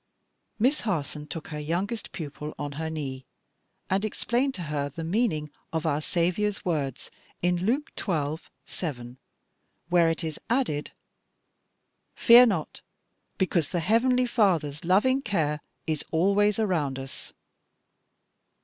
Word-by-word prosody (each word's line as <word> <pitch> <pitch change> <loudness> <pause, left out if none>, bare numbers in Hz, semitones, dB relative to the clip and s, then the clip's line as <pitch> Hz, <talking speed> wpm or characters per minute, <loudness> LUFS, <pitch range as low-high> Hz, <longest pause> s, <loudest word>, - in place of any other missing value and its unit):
Miss 260 +7 +2
Harson 150 -7 -2
took 160 +1 -7
her 150 - -4
youngest 185 +9 -2
pupil 150 -2 -6
on 145 -1 -4
her 160 +3 -3
knee 135 -4 -4 0.6
and 195 +2 +1
explained 240 +5 0
to 180 - -4
her 145 -2 -2
the 165 +4 -6
meaning 165 -5 0 0.2
of 160 0 -2
our 150 -1 +1
Saviour's 185 +6 0
words 145 -7 -2 0.3
in 175 0 +3
Luke 275 +6 0
xii. 155 -3 -1 0.2
7, 125 -7 -6 0.7
where 175 -2 +5
it 165 +1 -2
is 155 -2 -4
added, 230 - 0 1.3
"Fear 245 +1 +8
not,", 185 -9 -2 0.6
because 170 -5 +1
the 175 - -1
heavenly 240 +8 +3
Father's 170 - +1
loving 215 +10 +3
care 155 - 0 0.2
is 155 -2 -1
always 200 +5 +3
around 165 -11 0
us. 135 0 -7
170 Hz, 125 wpm, -27 LUFS, 150-210 Hz, 1.3 s, Fear